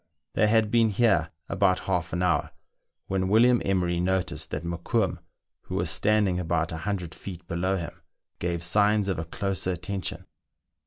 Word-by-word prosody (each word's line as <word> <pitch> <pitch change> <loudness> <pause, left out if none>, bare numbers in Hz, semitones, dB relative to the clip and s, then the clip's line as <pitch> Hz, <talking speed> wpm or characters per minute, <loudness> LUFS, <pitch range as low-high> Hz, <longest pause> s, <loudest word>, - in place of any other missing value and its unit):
They 105 - +3
had 110 -1 +3
been 115 -2 +4
here 100 -7 +2 0.2
about 95 -2 +2
half 90 -3 -1
an 90 +1 -1
hour, 90 -2 +1 0.6
when 95 -1 -1
William 120 +4 +5
Emery 90 -3 +1
noticed 85 -4 -1
that 75 +3 -4
Mokoum, 85 0 -1 0.5
who - - -5
was - - 0
standing 105 -4 +2
about 85 -1 0
loo 90 +2 -3
feet 90 0 -9
below 95 +2 0
him, 85 -2 -7 0.4
gave 85 -1 -2
signs 105 +3 +3
of 95 - -1
a 80 - -3
closer 95 +3 -2
attention. 90 +2 -4
95 Hz, 155 wpm, -27 LUFS, 85-100 Hz, 0.6 s, William